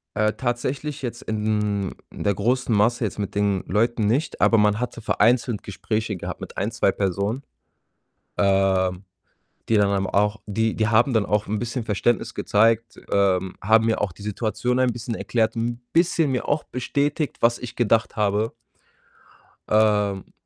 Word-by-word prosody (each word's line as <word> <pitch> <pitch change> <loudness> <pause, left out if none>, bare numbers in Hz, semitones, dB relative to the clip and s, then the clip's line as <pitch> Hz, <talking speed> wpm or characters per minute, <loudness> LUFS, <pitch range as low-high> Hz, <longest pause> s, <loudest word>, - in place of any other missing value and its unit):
Äh, 105 0 +2
tatsächlich 130 +4 -3
jetzt 120 -2 -5
in 105 -2 -1 0.2
der 100 - -1
großen 120 +3 +1
Masse 115 +3 +2
jetzt 105 - -4
mit 100 -2 -4
den 100 -2 0
Leuten 110 +2 +1
nicht, 135 +8 -1
aber 115 - +5
man 105 0 +3
hatte 125 -1 -4
vereinzelt 115 0 +2
Gespräche 105 +3 -3
gehabt - - -6
mit - - -9
1, 100 - 0
2 115 -4 +2
Personen, 100 +7 -2 0.9
ähm, 95 -1 +2 0.6
die 115 - +2
dann 100 -1 +3
eben 95 0 -1
auch 105 +2 +1
die 110 +2 0
die 110 - +1
haben 115 +5 +3
dann 110 -3 +2
auch 105 0 0
‘n 105 +1 -1
bisschen 120 +1 -3
Verständnis 110 +2 0
gezeigt, 115 +2 +1
ähm, 95 -2 +1
haben 110 +3 +4
mir 110 - +1
auch 100 -4 -1
die 100 - -16
Situation 110 +4 -1
ein 130 -2 +2
bisschen 120 0 -5
erklärt, 115 0 0
‘n 120 +1 -2
bisschen 165 -4 +2
mir 125 - -2
auch 150 +1 0
bestätigt, 145 +4 -2
was 120 0 +3
ich 125 - -8
gedacht 115 -2 +1
habe. 105 +1 0 1.2
Ähm 105 -2 +2
110 Hz, 160 wpm, -23 LUFS, 100-120 Hz, 1.2 s, aber